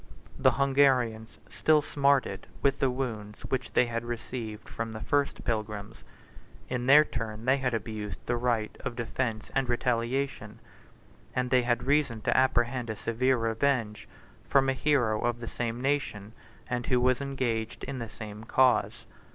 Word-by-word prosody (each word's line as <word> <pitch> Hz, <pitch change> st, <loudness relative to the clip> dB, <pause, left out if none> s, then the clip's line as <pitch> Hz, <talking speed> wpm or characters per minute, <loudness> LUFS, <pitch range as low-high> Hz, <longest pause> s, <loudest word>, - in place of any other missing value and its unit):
The 130 Hz, -, +5 dB
Hungarians 130 Hz, -5 st, +2 dB
still 155 Hz, -1 st, +3 dB
smarted 140 Hz, -9 st, +1 dB, 0.2 s
with 140 Hz, 0 st, +2 dB
the 135 Hz, -, +3 dB
wounds 115 Hz, -5 st, -4 dB
which 130 Hz, -, -2 dB
they -, -, +4 dB
had 115 Hz, -1 st, -3 dB
received 120 Hz, -2 st, -6 dB
from 115 Hz, 0 st, -5 dB
the 110 Hz, -, -6 dB
first 140 Hz, +5 st, 0 dB
pilgrims: 110 Hz, -1 st, -3 dB, 0.7 s
in 125 Hz, -1 st, -2 dB
their 150 Hz, +3 st, +8 dB
turn 110 Hz, -3 st, -5 dB
they 130 Hz, +1 st, +4 dB
had 125 Hz, -3 st, 0 dB
abused 110 Hz, -2 st, -4 dB
the 120 Hz, -, 0 dB
right 120 Hz, -3 st, 0 dB
of 125 Hz, -3 st, -5 dB
defence 115 Hz, -1 st, -3 dB
and 135 Hz, -2 st, 0 dB
retaliation; 120 Hz, -1 st, -1 dB, 0.8 s
and 125 Hz, 0 st, -1 dB
they 130 Hz, -1 st, +5 dB
had 120 Hz, 0 st, 0 dB
reason 140 Hz, -4 st, +1 dB
to -, -, +1 dB
apprehend 125 Hz, -1 st, +2 dB
a 110 Hz, -, -2 dB
severe 125 Hz, +5 st, +1 dB
revenge 115 Hz, -1 st, 0 dB, 0.4 s
from 135 Hz, -1 st, +4 dB
a -, -, +2 dB
hero 130 Hz, -6 st, +1 dB
of 120 Hz, 0 st, 0 dB
the 120 Hz, -, -7 dB
same 120 Hz, 0 st, -3 dB
nation, 125 Hz, -7 st, -2 dB, 0.3 s
and 125 Hz, -1 st, -3 dB
who 125 Hz, -, +3 dB
was 130 Hz, +1 st, +2 dB
engaged 120 Hz, -5 st, -2 dB
in 135 Hz, -1 st, -4 dB
the 115 Hz, -2 st, -5 dB
same 110 Hz, -2 st, -9 dB
cause. 130 Hz, +2 st, +2 dB
120 Hz, 160 wpm, -29 LUFS, 110-130 Hz, 0.8 s, their